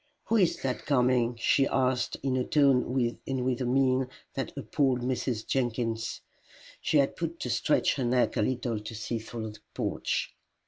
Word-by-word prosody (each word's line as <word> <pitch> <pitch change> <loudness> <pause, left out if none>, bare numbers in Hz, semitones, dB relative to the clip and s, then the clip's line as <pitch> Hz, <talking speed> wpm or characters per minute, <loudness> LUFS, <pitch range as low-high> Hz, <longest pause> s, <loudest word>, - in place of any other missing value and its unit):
"Who 230 - +4
is 185 -5 +3
that 130 -2 -2
coming?" 125 -3 +3
she 135 +3 +3
asked, 130 -1 0
in 135 -2 +1
a 130 - +1
tone 130 -4 +2
and 130 -2 -1
with 130 0 0
a - - 0
mien 130 0 +2 0.3
that 135 - -3
appalled 135 -2 +1
Mrs. 125 -2 -2
Jenkins. 115 -3 -1 0.6
She 155 - +2
had 140 -1 +3
but 170 0 -3
to 125 - -2
stretch 120 +6 +2
her 135 - -1
neck 125 +1 +2
a - - +1
little 120 -1 -1
to 105 +2 -7
see 115 +2 -3
through 110 0 -6
the 105 - -14 0.2
porch. - - -2
125 Hz, 175 wpm, -29 LUFS, 120-135 Hz, 0.6 s, Who